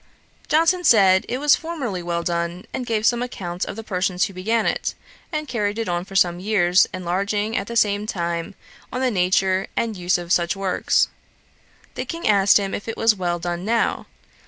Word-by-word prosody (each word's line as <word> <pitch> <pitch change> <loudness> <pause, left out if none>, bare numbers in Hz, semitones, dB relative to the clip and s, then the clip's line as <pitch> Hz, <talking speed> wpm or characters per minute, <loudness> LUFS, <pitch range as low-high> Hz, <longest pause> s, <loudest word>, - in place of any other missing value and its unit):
Johnson 330 +4 +3
said, 195 - +5
it 250 - -1
was 290 +2 +4
formerly 280 - -4
very - - -8
well 170 0 -1
done, 170 +3 -2
and 250 - -4
gave 220 -1 0
some 240 +1 +3
account 185 -7 -4
of - - -6
the 225 - -7
persons 185 -2 0
who 195 - -7
began 220 +5 0
it, - - -1 0.4
and 305 -2 -3
carried 210 -4 -2
it 225 - -2
on 175 0 -2
for 195 - -12
some 175 -3 +3
years; 185 -2 +3
enlarging, 200 +4 -2
at 195 - -2
the 235 - -6
same 210 -2 +2
time, 170 -1 -3 0.4
on 255 - -3
the 260 -1 +1
nature 190 0 +1
and 225 -2 -1
use 180 0 +1
of 175 -1 -7
such 170 +2 +1
works. 195 -1 +1 0.8
The - - -4
King 335 0 -4
asked 200 -2 +5
him 195 -1 -2
if 205 - -5
it 225 - -4
was 225 -1 +4
well 175 -3 -2
done 175 +1 -4
now. 230 +3 0
195 Hz, 200 wpm, -22 LUFS, 180-225 Hz, 0.8 s, said